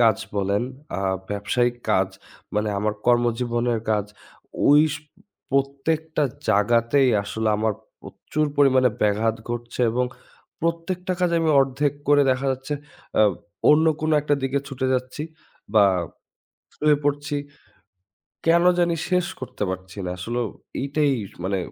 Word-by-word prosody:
কাজ 115 -4 +5 0.2
বলেন, 100 +2 +1 0.4
আ - - -3 0.3
ব্যবসায়িক 120 +4 0
কাজ - - +3 0.5
মানে 105 0 +1
আমার 105 +1 0
কর্মজীবনের 120 -1 +1
কাজ, 105 -2 +2 0.6
ওইস 150 +1 +5 0.6
প্রত্যেকটা 145 +4 0 0.3
জায়গাতেই 115 +6 +3
আসলে 110 +2 -2
আমার 110 +1 +1 0.3
প্রচুর 155 0 -3
পরিমাণে 130 -3 +5
ব্যাঘাত 110 +2 +2
ঘটছে 120 +1 -5
এবং 125 +2 +1 0.6
প্রত্যেকটা 170 +3 -2
কাজে 175 -1 +2
আমি 160 - +2
অর্ধেক 135 +1 +1 0.2
করে 145 0 +6
দেখা 130 +1 0
যাচ্ছে 135 +3 -4 0.5
আ - - +7 0.5
অন্য 155 +2 +5
কোনো 155 0 +1
একটা 145 0 +1
দিকে 135 +1 0
ছুটে 130 -1 -2
যাচ্ছি 130 +3 -3 0.5
বা 105 -2 +7 0.9
শুয়ে 150 -1 +3
পড়ছি। 145 0 0 1.1
কেন 170 +1 +5
জানি 175 -1 +3 0.2
শেষ 180 -1 +2
করতে 130 - -6
পারছি 95 +1 -7
না। 90 - -3
আসলেও 120 +5 -2 0.4
এটাই 145 0 +1 0.3
মানে 95 +1 0
130 Hz, 125 wpm, -23 LUFS, 110-150 Hz, 1.1 s, আ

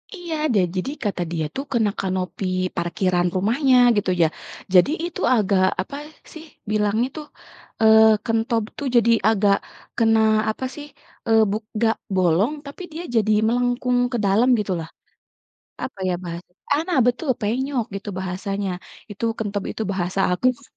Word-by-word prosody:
Iya, 345 -3 -5 0.2
da 205 - +3 0.2
jadi 185 +9 -2
kata 200 -4 -2
dia 160 -2 -1
tuh 275 - -3
kena 225 -3 +2
kanopi 185 0 -3 0.3
parkiran 175 +1 0
rumahnya 245 +8 +2 0.2
gitu 205 -2 0
ya. 165 - +5 0.5
Jadi 180 +7 +6 0.2
itu 345 - -6
agak 200 -4 +2 0.2
apa 195 - -8 0.4
sih 315 0 -10 0.3
bilangnya 215 +3 +1
tuh, 305 - -6 0.6
eee, 220 0 +7
kentob 225 0 0
tuh 285 - -3
jadi 235 -1 +5 0.2
agak 205 -2 +3 0.4
kena 225 -1 +4 0.3
apa 220 +4 -3
sih, 295 - -8 0.4
eee, 225 0 +5
buk 215 +2 -2
nggak 225 0 +2 0.2
bolong 185 - +2
tapi 280 +6 -10
dia 330 +2 -5
jadi 215 -1 +2 0.2
melengkung 245 +1 +1
ke 240 - -1
dalam 210 +6 +3
gitulah. 180 -6 -3 0.9
Apa 230 - -6
ya - - 0
bahasa 170 +1 -7 0.2
ah, 300 - +2
nah 345 - +2
betul 250 +5 -1
penyok 250 +4 -1
gitu 200 +1 -6
bahasanya. 195 +2 -3 0.4
Itu 205 - -9
kentob 205 -2 -3
itu 220 - -4
bahasa 185 0 -2
apa 180 +7 -2
si 280 - -21
215 Hz, 155 wpm, -22 LUFS, 190-245 Hz, 0.9 s, eee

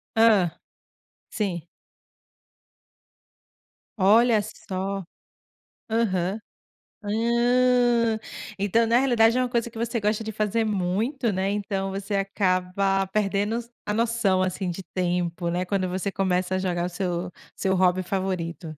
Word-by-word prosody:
Hã, 220 -6 +5 0.8
sim. 185 -6 -2 2.4
Olha 220 +3 +5
só. 195 -2 -5 0.9
Aham. 200 -3 0 0.6
Ah, 235 +1 +2 0.4
então 205 +4 +2
na 235 +2 +4
realidade 240 -3 +4
é - - +2
uma 250 - 0
coisa 235 -1 -1
que 225 - -10
você 235 0 -1
gosta 210 +1 0
de 220 - -4
fazer 215 +2 0
muito, 215 +6 -1
né, 190 +1 0
então 195 -1 -2
você 195 +1 -3
acaba 195 0 0
perdendos 210 +4 -1
a 210 - -2
noção, 225 -5 +2
assim, 185 0 -2
de 190 +3 -6
tempo, 175 -1 -1
né, 175 +2 -1
quando 185 0 -1
você 185 +2 -2
começa 185 -1 0
a - - 0
jogar 175 -2 -1
o - - -2
seu 180 -1 -3 0.2
seu 190 -1 0
hobby 185 0 +3
favorito. 185 -3 -3
200 Hz, 125 wpm, -25 LUFS, 185-225 Hz, 2.4 s, Hã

